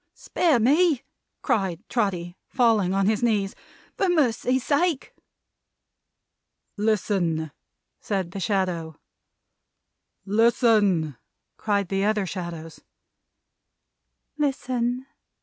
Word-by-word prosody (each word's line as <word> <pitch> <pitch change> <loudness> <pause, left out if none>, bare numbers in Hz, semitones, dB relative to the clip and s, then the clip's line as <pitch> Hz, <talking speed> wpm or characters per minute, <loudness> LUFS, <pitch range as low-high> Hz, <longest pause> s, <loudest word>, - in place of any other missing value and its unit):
"Spare 315 -8 +1
me," 285 +3 +3 0.4
cried 195 -2 -1
Trotty, 180 -7 -1
falling 225 -7 +2
on 195 0 +1
his 215 +1 +1
knees; 210 -5 +1 0.4
"for 390 - +1
Mercy's 260 -5 +1
sake!" 305 0 0 1.6
"Listen!" 190 -7 0 0.5
said 190 -4 -3
the 195 - -6
Shadow. 175 -5 -1 1.3
"Listen!" 210 - +3 0.4
cried 200 -3 -1
the 195 0 0
other 210 -1 +1
Shadows. 170 -3 -7 1.6
"Listen!" 255 -3 -1
210 Hz, 80 wpm, -25 LUFS, 185-245 Hz, 1.6 s, me